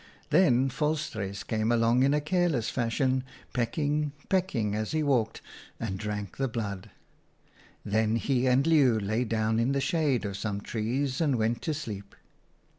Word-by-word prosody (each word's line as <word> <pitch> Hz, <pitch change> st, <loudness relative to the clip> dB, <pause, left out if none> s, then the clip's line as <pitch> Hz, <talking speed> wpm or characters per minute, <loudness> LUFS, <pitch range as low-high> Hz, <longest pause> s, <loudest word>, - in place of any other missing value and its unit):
Then 130 Hz, -7 st, +4 dB
Vol 150 Hz, +4 st, 0 dB
struis 110 Hz, -9 st, -5 dB
came 110 Hz, 0 st, 0 dB
along 115 Hz, +1 st, +3 dB
in 135 Hz, +1 st, +4 dB
a -, -, +2 dB
careless 155 Hz, -6 st, 0 dB
fashion, 130 Hz, +2 st, 0 dB, 0.3 s
peck 115 Hz, +1 st, -1 dB
ing, 150 Hz, -1 st, 0 dB, 0.2 s
pecking 140 Hz, -, +1 dB
as 110 Hz, +4 st, -2 dB
he 155 Hz, -1 st, +1 dB
walked, 125 Hz, -6 st, 0 dB, 0.4 s
and 95 Hz, -4 st, -3 dB
drank 105 Hz, -2 st, -4 dB
the 135 Hz, -, 0 dB
blood. 105 Hz, -5 st, -4 dB, 1.0 s
Then 110 Hz, +1 st, +1 dB
he 130 Hz, +1 st, +1 dB
and 130 Hz, +2 st, +3 dB
Leeuw 140 Hz, -8 st, +4 dB
lay 110 Hz, +4 st, -1 dB
down 110 Hz, 0 st, 0 dB
in 120 Hz, +4 st, +2 dB
the 140 Hz, -, +1 dB
shade 140 Hz, -5 st, +1 dB
of 100 Hz, -1 st, -4 dB
some 100 Hz, -1 st, -3 dB
trees 125 Hz, +7 st, -2 dB
and 145 Hz, -5 st, +2 dB
went 115 Hz, 0 st, 0 dB
to 160 Hz, -3 st, -2 dB
sleep. 105 Hz, -9 st, -7 dB
120 Hz, 165 wpm, -28 LUFS, 110-145 Hz, 1.0 s, Then